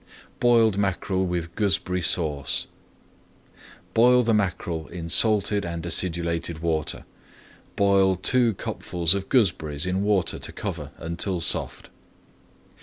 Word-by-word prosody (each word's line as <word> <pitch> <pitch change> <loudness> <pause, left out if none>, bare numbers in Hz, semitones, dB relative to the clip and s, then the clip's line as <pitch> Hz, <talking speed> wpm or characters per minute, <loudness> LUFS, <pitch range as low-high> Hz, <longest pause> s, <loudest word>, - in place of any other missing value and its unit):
BOILED 115 -4 +3
MACKEREL 95 -1 -1
WITH 85 -1 -3
GOOSEBERRY 90 -3 0
SAUCE 75 -6 +1 1.3
Boil 125 +2 +5
the 115 -1 +1
mackerel 90 -6 -2
in 85 0 -7
salted 105 +1 +2
and 85 -1 -5
acidulated 85 -1 -2
water. 80 -2 -2 0.7
Boil 100 -1 +3
two 115 +4 +2
cupfuls 85 -2 0
of 100 0 -4
gooseberries 85 - +1
in 90 +1 -1
water 100 -4 0
to - - -5
cover - - -6
until 85 +2 -3
soft. 85 - -2
90 Hz, 110 wpm, -24 LUFS, 85-100 Hz, 1.3 s, Boil